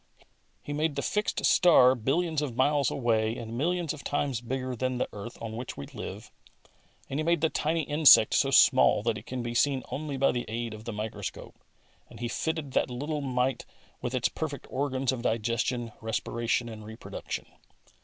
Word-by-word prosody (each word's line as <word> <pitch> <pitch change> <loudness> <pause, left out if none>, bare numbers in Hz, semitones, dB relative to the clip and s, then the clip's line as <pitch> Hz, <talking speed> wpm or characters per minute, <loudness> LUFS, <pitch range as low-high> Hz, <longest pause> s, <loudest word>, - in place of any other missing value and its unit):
He 145 - -5
made 150 0 0
the 140 - -2
fixed 210 0 -1
star 145 -8 +6
billions 150 +6 0
of 135 -6 -3
miles 140 0 +3
away 115 -3 +1
and 115 -1 -6
millions 170 +4 0
of 150 - -10
times 140 -4 -1
bigger 130 +1 -3
than 130 +1 -1
the - - 0
earth 110 +4 -8
on 115 -1 -6
which 120 +2 -6
we 70 - -6
live, - - -8 0.8
and 135 - -3
He - - 0
made 170 0 +2
the 160 - +2
tiny 160 +1 0
insect 145 -7 +6
so 135 - +3
small 130 -5 +5
that 115 -1 +1
it - - -18
can 125 -1 -4
be 120 0 -3
seen 135 +1 +2
only 145 -1 -4
by 135 +1 +3
the 120 0 -3
aid 115 0 -3
of 110 0 -10
the 120 - -3
microscope, 105 0 -6 0.6
and - - -13
He 120 - -2
fitted 160 +3 -3
that 130 - +1
little 145 +5 -3
mite 130 -1 -1 0.3
with 125 0 -3
its 120 -2 +2
perfect 150 -3 -5
organs 135 -1 0
of 130 -2 -4
digestion, 115 +1 -1
respiration 115 +1 -1
and 110 -2 -8
reproduction. 110 +1 -6
130 Hz, 185 wpm, -28 LUFS, 115-145 Hz, 0.8 s, star